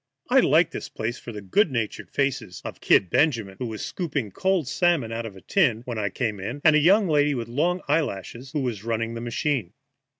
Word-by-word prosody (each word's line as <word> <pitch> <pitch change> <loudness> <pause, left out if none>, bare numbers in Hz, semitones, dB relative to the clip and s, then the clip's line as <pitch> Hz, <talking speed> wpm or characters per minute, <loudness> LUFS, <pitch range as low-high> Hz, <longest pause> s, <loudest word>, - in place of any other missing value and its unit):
I - - +7
liked - - +4
this - - -6
place 115 +2 -4
for 120 - -8
the 105 -2 -8
good 165 - +2
natured 115 -5 -3
faces 135 -9 -2
of - - -6
"Kid" 90 -3 +4
Benjamin, 115 -11 +1
who 125 - -2
was 110 -2 -5
scooping 140 - -3
cold 190 - 0
salmon 155 -5 +1
out 115 0 -3
of 100 - -11
a 95 - -13
can 120 - +2
when 120 -3 -4
I 100 -1 0
came 105 0 -2
in, 115 +9 -5
and 155 - +6
a - - +6
young 195 +6 +5
lady 145 -2 +3
with 120 -2 -4
long 170 +9 0
eyelashes, 130 - -2
who 150 - -1
was 115 -6 -3
running 115 0 -2
the 115 - -5
machine. 120 - -2
120 Hz, 220 wpm, -25 LUFS, 110-150 Hz, -, I